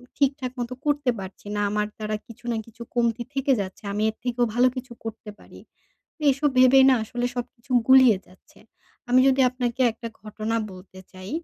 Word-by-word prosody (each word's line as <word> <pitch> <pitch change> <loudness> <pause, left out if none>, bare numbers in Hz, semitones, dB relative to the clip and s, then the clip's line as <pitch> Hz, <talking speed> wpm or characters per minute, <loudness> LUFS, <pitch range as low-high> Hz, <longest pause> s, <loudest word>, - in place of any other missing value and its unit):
ঠিকঠাক 275 -2 0
মতো 240 +1 -3
করতে 290 -3 +1
পারছি 190 +1 -9
না, 205 - 0
আমার 210 0 0
দ্বারা 215 0 -3
কিছু 235 0 -14
না 230 - -1
কিছু 230 +1 -16
কমতি 235 0 +1
থেকে 270 0 0
যাচ্ছে 190 +1 -6
আমি 210 +1 -1
এর 220 - -7
থেকেও 245 -1 +1
ভালো 245 +1 +4
কিছু 255 0 -7
করতে 225 -1 -7
পারি। - - -15 0.6
তো 320 - -47
এসব 290 +2 +1
ভেবেই 265 +1 +7
না - - +6
আসলে 240 +3 -3
সবকিছু 245 0 -7 0.2
গুলিয়ে 260 -5 +7
যাচ্ছে। 185 - -22 0.5
আমি 255 +1 +5
যদি 265 0 +3
আপনাকে 250 0 -3
একটা 230 +1 -7
ঘটনা 215 +1 -3 0.2
বলতে 185 0 -13
চাই 185 +1 -9
240 Hz, 185 wpm, -24 LUFS, 215-255 Hz, 0.6 s, ভেবেই